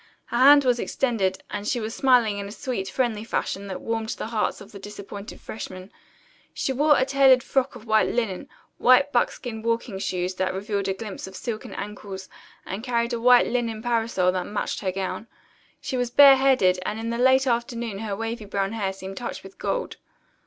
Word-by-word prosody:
Her 240 - -3
hand 285 +3 +8
was 245 -1 +2
extended, 215 -10 -1
and 205 0 -4
she 245 - 0
was 220 0 -4
smiling 240 -6 +3
in 200 - -5
a - - -8
sweet, 215 -4 -4
friendly 225 -1 -1
fashion 200 -3 -3
that 190 - -6
warmed 225 -1 -3
the - - -4
hearts 220 -2 -1
of 200 - -13
the 200 - -10
disappointed 200 0 -9
freshmen. 185 -3 -8 0.6
She 265 - -1
wore 295 +2 +4
a 260 - +2
tailored 270 -2 +5
frock 265 -2 0
of 235 -2 -11
white 220 -1 +3
linen, 225 -6 -2 0.3
white 255 +3 +5
buckskin 240 -2 -1
walking 230 -3 -2
shoes 180 -1 -2
that 185 0 -1
revealed 200 0 -2
a 190 - -1
glimpse 205 -2 -7
of 190 - -11
silken 220 +2 -5
ankles, 200 -2 -7 0.4
and 195 +4 -5
carried 235 -1 0
a 235 - -2
white 245 0 +6
linen 230 -2 -2
parasol 225 -6 +1
that 180 -1 -3
matched 205 - -3
her 190 - -1
gown. 195 +4 -4 0.5
She 275 -2 -3
was 245 -1 0
bareheaded, 265 -8 +6
and 210 +3 -3
in 230 +1 -3
the 235 - -3
late 260 +1 +4
afternoon 235 -3 -2
her 210 -2 -3
wavy 225 +1 -4
brown 195 -1 -2
hair 200 -4 -2
seemed 190 0 -8
touched 245 - -5
with 195 0 -14
gold. - - -2
225 Hz, 195 wpm, -24 LUFS, 195-245 Hz, 0.6 s, hand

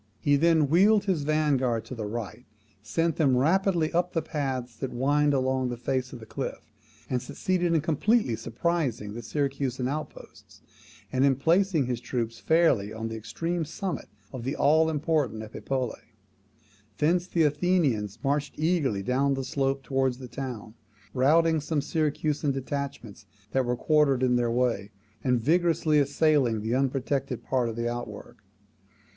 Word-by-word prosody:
He 145 - +3
then 160 0 +4
wheeled 200 +7 +4
his 190 -6 0
vanguard 140 -6 +1
to 120 - -8
the 110 -4 -4
right, 115 0 -6 0.4
sent 165 +11 -1
them 135 -6 +3
rapidly 170 +3 +2
up 175 +1 +1
the 165 - 0
paths 130 -5 -3
that 130 +2 -4
wind 145 +4 +2
along 130 -1 +1
the 120 - -4
face 130 +1 -2
of 125 - -8
the 110 - -11
cliff, - - -6 0.4
and 125 -1 -1
succeeded 175 +2 0
in 160 - +3
completely 165 - +1
surprising 120 -4 -2
the 120 - -6
Syracusan 135 0 -2
outposts, 150 +3 -8 0.5
and 130 0 +1
in 140 -1 +4
placing 165 +2 +2
his 120 -1 -3
troops 115 -2 -3
fairly 150 -12 +2
on 110 +1 -4
the 115 - -5
extreme 165 +11 -3
summit 185 +4 -4 0.3
of 130 -3 -6
the 135 +4 -2
all 160 +2 +4
important 150 -8 0
Epipolae. 125 +3 -4 0.8
Thence 170 +4 +2
the 170 -3 +2
Athenians 150 - +1
marched 145 +1 -1
eagerly 150 - +1
down 135 +4 +1
the 135 - -3
slope 135 +1 -1
towards 135 -2 0
the 130 -1 -9
town, 120 -5 -6 0.4
routing 160 +4 +3
some 155 +1 -1
Syracusan 150 0 0
detachments 135 -5 -5 0.2
that 130 -1 +1
were 120 0 -1
quartered 145 -4 +3
in 125 -1 +3
their 120 -1 +1
way, 115 -4 0 0.3
and 125 -2 +2
vigorously 160 +2 +2
assailing 140 -5 +2
the 110 +2 -2
unprotected 135 0 -1
part 125 -3 0
of 115 - -5
the 115 0 -2
outwork. 120 0 -6
135 Hz, 155 wpm, -27 LUFS, 120-155 Hz, 0.8 s, then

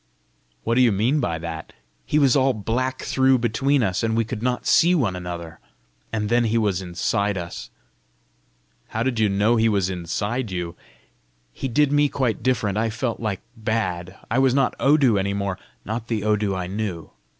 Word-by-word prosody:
"What - - 0
do 125 - +4
you 120 -3 +5
mean 115 +9 +2
by 85 - -1
that?" 80 -1 -7 0.3
"He 150 - +1
was 140 -4 +4
all 135 -1 +3
black 125 +5 -2
through 130 0 +3
between 125 +3 +1
us, 95 -3 0
and 115 -1 0
we 115 - +2
could 110 -1 -5
not 125 0 -1
see 175 +2 +5
one 110 - +1
another; 85 -2 -7 0.5
and 105 -2 -1
then 120 +2 +2
he 115 +1 +1
was 100 -4 +1
inside 100 +3 -1
us." 85 -1 -6 1.2
"How 110 - -2
did 125 -3 -1
you 110 -2 +3
know 105 +4 +2
he 115 0 +3
was 100 -3 +1
inside 100 +7 -2
you?" 90 -2 -4 0.8
"He 135 - -4
did 140 +3 +2
me 145 0 +3
quite 130 -6 -1
different. 105 -5 0
I 115 0 +1
felt 115 +1 -3
like 105 -5 -3
bad. 100 -5 -2
I 125 - +2
was 130 -1 +3
not 135 -2 +2
Odu 135 -7 +4
any 100 +1 -1
more 100 -2 -2 0.3
not 110 +2 -4
the 110 -3 -2
Odu 105 -2 +1
I 90 -1 -3
knew. 95 -3 -4
110 Hz, 185 wpm, -23 LUFS, 95-125 Hz, 1.2 s, you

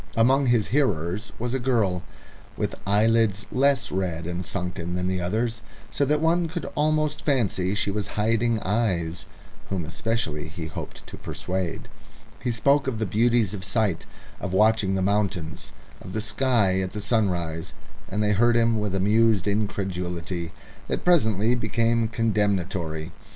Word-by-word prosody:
Among 130 +4 +4
his 120 -4 +2
hearers 100 - 0
was 120 +1 -3
a 135 - 0
girl, 110 -8 +1 0.6
with - - -1
eyelids 105 -1 +3
less 135 0 +2
red 90 -3 -2
and 90 +1 -3
sunken 90 0 -3
than 90 0 -1
the 95 -1 -1
others, 110 +6 -1 0.3
so 140 - +1
that 150 +2 +2
one 165 +1 +2
could 165 0 -5
almost 155 0 +1
fancy 105 -9 +1
she 105 - 0
was 105 0 -2
hiding 115 +2 +2
eyes, 90 -7 -1 0.4
whom 95 -4 -2
especially 85 -3 -2
he 80 +1 -6
hoped 80 - -8
to - - -10
persuade. 90 -2 -4 0.5
He 125 - -2
spoke 140 +4 +2
of 125 -4 -1
the 110 - -1
beauties 115 0 +2
of 95 -3 -6
sight, 100 -2 0 0.3
of 95 -2 -4
watching 105 -1 +3
the 95 - 0
mountains, 95 -5 -1 0.3
of 90 - -9
the 110 - -1
sky 110 -2 +2
and 95 -1 -1
the 105 - -5
sunrise, 90 -7 0 0.3
and 105 +2 -1
they 105 - +2
heard 120 +3 +4
him 115 -1 +3
with 105 -2 -2
amused 105 +1 +3
incredulity 90 -4 -2 0.4
that - - -3
presently 110 - +3
became 115 0 +1
condemnatory. 95 -8 -1
105 Hz, 150 wpm, -25 LUFS, 90-115 Hz, 0.6 s, Among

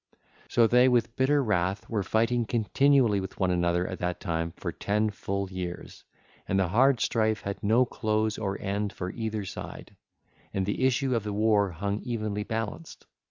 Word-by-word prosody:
So 115 - +4
they, 125 +3 +5
with 120 -2 +1
bitter 140 +2 +3
wrath, 95 -3 0
were 110 -3 -1
fighting 115 +4 +1
continually 120 0 +3
with 95 0 -7
one 95 -1 +2
another 85 0 +1
at - - -5
that 90 0 -2
time 85 0 -2
for - - -4
ten 105 +1 0
full 100 -1 -3
years, 90 -2 -6 0.4
and 95 - +1
the 95 -3 +1
hard 130 +5 +4
strife 110 0 +1
had 100 0 -5
no 115 +5 +4
close 110 -3 -1
or 100 -2 -2
end 100 +1 -2
for 90 0 -4
either 110 -3 -3
side, - - -8 0.6
and 95 -1 0
the 105 +6 -2
issue 130 0 +1
of 115 - 0
the 105 - -3
war 105 -1 +3
hung 100 +4 -3
evenly 110 -4 -3
balanced. 115 +9 -5
105 Hz, 175 wpm, -28 LUFS, 95-115 Hz, 0.6 s, they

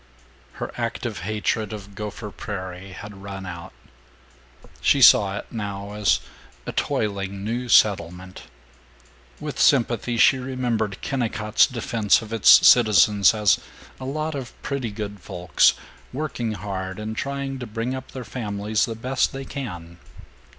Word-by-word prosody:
IX - - -24
Her - - -4
active - - -3
hatred 110 +2 -2
of 100 -2 -8
Gopher 105 +1 -6
Prairie 95 -1 -7
had 100 0 -10
run 95 -1 -7
out. 85 -2 -8 1.1
She - - +3
saw 100 -1 +6
it - - -6
now 100 -2 -5
as 105 -1 +1 0.4
a - - -4
toiling 100 -2 -2
new 120 +3 -3
settlement. 90 -3 +2 0.9
With - - -6
sympathy 120 -1 +2
she 130 +3 +5
remembered 120 -6 -2
Kennicott's 115 -5 +1
defense 115 -4 +1
of 110 0 -8
its 115 - +7
citizens 105 -3 +6
as 105 -2 +3 0.4
"a 130 - -7
lot 155 +3 -3
of 135 -3 -7
pretty 135 -4 -2
good 105 -1 -6
folks, 90 -1 +2 0.4
working 125 -5 -3
hard 95 -2 -5
and 110 +1 -5
trying 140 +1 -3
to 125 - -6
bring 115 +4 -3
up 130 -1 -7
their 130 -2 -7
families 105 -1 -1
the 115 - -4
best 130 +3 0
they 135 0 -6
can." 90 - -7
105 Hz, 140 wpm, -23 LUFS, 100-120 Hz, 1.1 s, its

